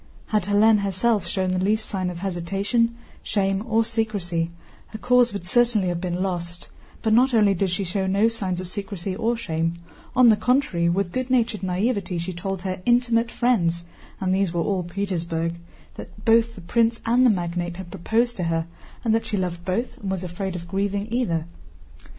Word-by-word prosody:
Had 210 -4 +1
Hélène 210 +2 +5
herself 200 +2 +1
shown 190 -1 -1
the 185 - 0
least 215 +3 +1
sign 185 -2 -2
of 175 - -6
hesitation, 195 +6 0 0.3
shame, 195 -1 0
or 225 0 +2
secrecy, 200 -8 -1 0.4
her 215 - -8
cause 245 +1 +3
would 200 -4 -6
certainly 220 -1 +2
have 175 -1 -2
been 180 0 -2
lost; 175 -2 -4 0.3
but 220 -1 +2
not 250 +2 +4
only 210 -3 +5
did 195 +1 0
she 180 +3 -1
show 190 +1 -1
no 200 +4 +3
signs 195 -6 -2
of 185 - -5
secrecy 195 -1 -4
or 230 +4 0
shame, 165 -5 -1 0.4
on 250 -2 +7
the 220 - +6
contrary, 210 -9 +1
with 180 +1 0
good 255 +3 -2
natured 235 -4 +1
naïveté 190 0 -1
she 175 +2 -4
told 190 +1 -4
her 185 -1 -3
intimate 240 0 +2
friends 170 -9 +1 0.3
(and 185 -1 0
these 190 -2 +1
were 170 -1 0
all 190 +1 0
Petersburg) 170 -3 -2 0.4
that 205 - -11
both 230 0 +4
the 185 - -10
prince 230 +6 +1
and 240 +2 +4
the 255 - +6
magnate 175 -3 -1
had 185 -2 -8
proposed 230 +6 0
to 180 - -1
her 165 -1 0 0.4
and 225 - +2
that 225 - 0
she 205 - -1
loved 175 -2 -3
both 195 +7 -2
and 200 - -5
was 190 -1 -2
afraid 180 +1 -4
of 170 -1 -6
grieving 200 +2 -1
either. 170 -11 0
195 Hz, 190 wpm, -24 LUFS, 175-225 Hz, 0.4 s, on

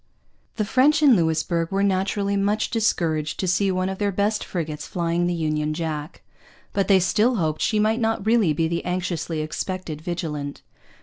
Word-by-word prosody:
The 215 - -1
French 290 +7 +3
in 275 -5 +7
Louisbourg 165 -1 0
were 195 0 0
naturally 200 +1 0
much 205 +2 0
discouraged 165 -9 0
to 190 - -1
see 195 +3 +2
one 185 0 0
of 190 0 -4
their 205 -1 +1
best 205 +3 0
frigates 155 -4 -4
flying 170 0 0
the 175 - 0
Union 155 -1 -1
Jack. 155 -1 -5 0.5
But 195 - +1
they 195 -2 +6
still 215 +7 +2
hoped 155 -6 -1
she 215 - +1
might 215 +2 +2
not 225 -3 0
really 220 -6 +3
be 160 +2 +1
the 170 +1 -2
anxiously 175 -3 -2
expected 155 0 -4
Vigilant. 155 -4 -4
185 Hz, 175 wpm, -23 LUFS, 160-205 Hz, 0.5 s, in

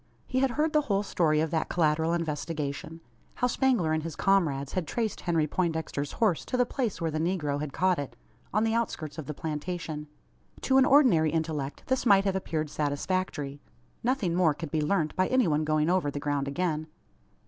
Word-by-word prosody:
He 260 - -1
had 270 0 +3
heard 305 +1 +1
the 305 - +4
whole 200 -8 0
story 155 -6 +2
of 160 -1 -1
that 160 -2 -1
collateral 160 -1 +2
investigation 155 -1 -3 0.3
how - - 0
Spangler 245 - +2
and 160 - 0
his 165 -1 -6
comrades 150 -8 +1
had 180 -4 -2
traced 225 -3 -2
Henry 165 -3 +1
Poindexter's 160 -3 -2
horse 210 -8 +1
to 255 - -2
the 250 - +4
place 240 -4 -2
where 165 -2 -1
the 155 - -2
negro 160 -4 -1
had 150 -1 -4
caught 185 +1 +1
it 140 - -5 0.4
on 215 +2 +2
the 225 0 +1
outskirts 165 -10 -2
of 145 - -7
the 150 - -5
plantation. 155 0 -4 0.5
To 265 0 +4
an 265 - +5
ordinary 250 - +5
intellect 155 -3 -3
this 260 -1 0
might 200 -2 +6
have 195 -1 +1
appeared 155 -5 -2
satisfactory. 145 -1 -2 0.4
Nothing 235 -8 +1
more 170 -4 +3
could 160 -2 -6
be 155 - +1
learnt 155 0 0
by 185 0 +2
any 255 -5 +3
one 155 -1 +1
going 155 0 +1
over 175 -4 +2
the 145 - -4
ground 145 -1 -1
again. 155 +1 -1
165 Hz, 195 wpm, -28 LUFS, 150-195 Hz, 0.5 s, might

